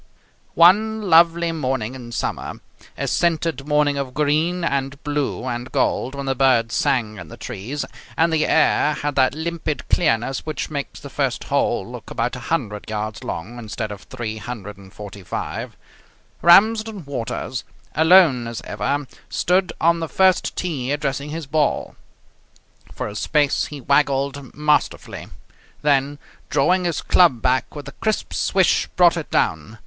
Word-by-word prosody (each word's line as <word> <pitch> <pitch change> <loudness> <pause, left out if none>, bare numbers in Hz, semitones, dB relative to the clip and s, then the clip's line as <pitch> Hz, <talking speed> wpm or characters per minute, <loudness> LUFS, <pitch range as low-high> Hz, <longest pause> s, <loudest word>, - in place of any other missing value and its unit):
One 215 +6 +5
lovely 170 +1 +5
morning 130 -7 -2
in 120 -3 -9
summer, - - -3 0.4
a - - -2
scented 165 -4 0
morning 150 -1 +2
of 130 -2 -5
green 155 +4 +1
and 140 -3 -1
blue 145 -4 -2
and 120 0 -4
gold, 130 +3 0
when 140 0 -5
the 135 - +1
birds 125 -3 +2
sang 110 -5 0
in - - -9
the 115 - -11
trees 120 +5 -5 0.3
and 165 0 +3
the 155 - +2
air 150 - +3
had 145 0 -2
that 130 0 +2
limpid 160 -1 -3
clearness 135 -5 +1
which 155 -1 -4
makes 140 -2 -5
the - - -10
first - - -1
hole - - 0
look - - -9
about - - -2
100 105 0 -3
yards 110 0 -4
long 115 +9 -6
instead 110 -1 -5
of 100 - -8
345, 105 -4 -7 0.6
Ramsden 215 +1 +4
Waters, 130 -1 -4 0.3
alone 160 -7 +5
as 115 -1 -5
ever, 145 +1 -2 0.2
stood 180 +1 +1
on 170 +1 +3
the 165 -1 -4
first 190 -1 +2
tee 140 -8 -2
addressing 145 -1 -2
his 160 +1 -5
ball. 150 +1 0 1.0
For - - -4
a 105 - -7
space 145 +5 +1
he 145 - -8
waggled 140 0 0
masterfully, 150 +1 0 0.6
then, 145 0 +2 0.3
drawing 180 +6 +2
his 170 -2 -1
club 170 -10 +4
back 130 +3 +1
with 145 -2 -8
a - - -7
crisp 215 -1 -1
swish, 190 -3 +2
brought 175 -1 +5
it 165 -3 -5
down. 95 +8 -1
140 Hz, 145 wpm, -21 LUFS, 120-165 Hz, 1.0 s, One